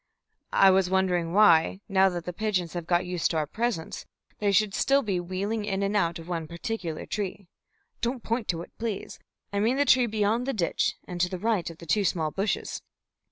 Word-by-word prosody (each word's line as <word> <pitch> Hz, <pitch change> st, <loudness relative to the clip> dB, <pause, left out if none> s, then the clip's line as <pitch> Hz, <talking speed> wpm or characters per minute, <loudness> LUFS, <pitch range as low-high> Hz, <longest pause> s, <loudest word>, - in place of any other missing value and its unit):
"I 195 Hz, -1 st, +7 dB
was 190 Hz, -1 st, +3 dB
wondering 180 Hz, -3 st, +1 dB
why, 190 Hz, -2 st, +5 dB
now 195 Hz, 0 st, +4 dB
that 175 Hz, -2 st, -5 dB
the 180 Hz, -, -4 dB
pigeons 185 Hz, -4 st, -1 dB
have 170 Hz, -2 st, -5 dB
got 175 Hz, 0 st, +2 dB
used 180 Hz, -2 st, 0 dB
to 165 Hz, -, -1 dB
our 155 Hz, -, +1 dB
presence, 215 Hz, 0 st, -3 dB, 0.3 s
they 205 Hz, -1 st, +2 dB
should 205 Hz, 0 st, +3 dB
still 275 Hz, +5 st, +3 dB
be 195 Hz, -4 st, -1 dB
wheeling 195 Hz, +5 st, -2 dB
in 195 Hz, -1 st, -1 dB
and 200 Hz, +1 st, -1 dB
out 170 Hz, -4 st, +1 dB
of 165 Hz, 0 st, -10 dB
one 165 Hz, -3 st, -3 dB
particular 170 Hz, -1 st, -4 dB
tree. 200 Hz, -1 st, -4 dB, 0.6 s
Don't 240 Hz, 0 st, -2 dB
point 230 Hz, -1 st, -2 dB
to 170 Hz, -2 st, -1 dB
it, -, -, -14 dB
please! 220 Hz, -4 st, -4 dB, 0.3 s
I 200 Hz, -, +1 dB
mean 230 Hz, +6 st, +2 dB
the 285 Hz, -, +3 dB
tree 255 Hz, -2 st, +5 dB
beyond 220 Hz, +3 st, 0 dB
the 275 Hz, -, 0 dB
ditch, 180 Hz, -6 st, 0 dB
and 175 Hz, -1 st, -4 dB
to 180 Hz, -, +2 dB
the 185 Hz, -, -4 dB
right 210 Hz, -3 st, 0 dB
of 165 Hz, -, -11 dB
two 170 Hz, +6 st, 0 dB
small 160 Hz, -4 st, 0 dB
bushes." 200 Hz, +5 st, -2 dB
190 Hz, 205 wpm, -27 LUFS, 175-215 Hz, 0.6 s, I